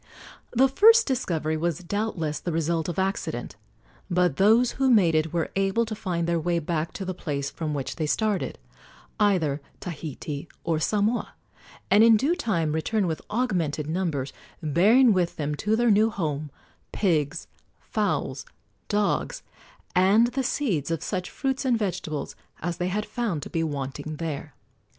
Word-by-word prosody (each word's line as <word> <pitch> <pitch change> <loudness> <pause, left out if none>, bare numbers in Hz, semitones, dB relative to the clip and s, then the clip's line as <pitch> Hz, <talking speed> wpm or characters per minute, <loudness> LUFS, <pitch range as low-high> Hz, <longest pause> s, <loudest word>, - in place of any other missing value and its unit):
The 260 +3 +4
first 450 - +6
discovery 165 - -1
was 170 +1 -2
doubtless 170 -6 -2
the 175 - -3
result 165 +1 0
of 170 - -4
accident; 190 +1 -2 0.5
but 180 -5 +2
those 225 +5 +5
who 270 0 +1
made 195 -9 +5
it 155 0 +1
were 170 -2 -1
able 195 +4 +1
to 220 - -5
find 180 -6 -2
their 170 0 +1
way 170 +2 0
back 165 0 -2
to 195 - -5
the 185 - -2
place 140 -5 -3
from 155 -1 -3
which 135 -2 -4
they 155 -2 -1
started 210 +6 0 0.6
either 170 -9 +2 0.2
Tahiti 155 -2 -6 0.2
or 165 -2 0
Samoa 210 +7 0 0.6
and 205 +3 +7
in 225 -1 +7
due 280 +9 +2
time 170 - 0
return 190 +7 0
with 160 -3 -2
augmented 175 - 0
numbers, 155 -6 -2 0.3
bearing 210 - +5
with 180 -2 0
them 150 -1 -2
to 210 +9 0
their 240 0 +3
new 215 +2 +4
home 155 -7 -3 0.4
pigs, 155 -8 0 0.3
fowls, - - -2 0.4
dogs, 210 - 0 0.5
and 200 +6 +5
the 260 +3 -1
seeds 215 - -1
of 165 -2 -2
such 185 -3 -3
fruits 270 -1 -2
and 250 -3 +2
vegetables 170 -8 -3 0.2
as 175 +1 -3
they 180 - -1
had 210 +3 -1
found 205 - -2
to - - -9
be 165 - 0
wanting 145 0 -4
there. 155 -3 -5
180 Hz, 160 wpm, -26 LUFS, 155-215 Hz, 0.6 s, and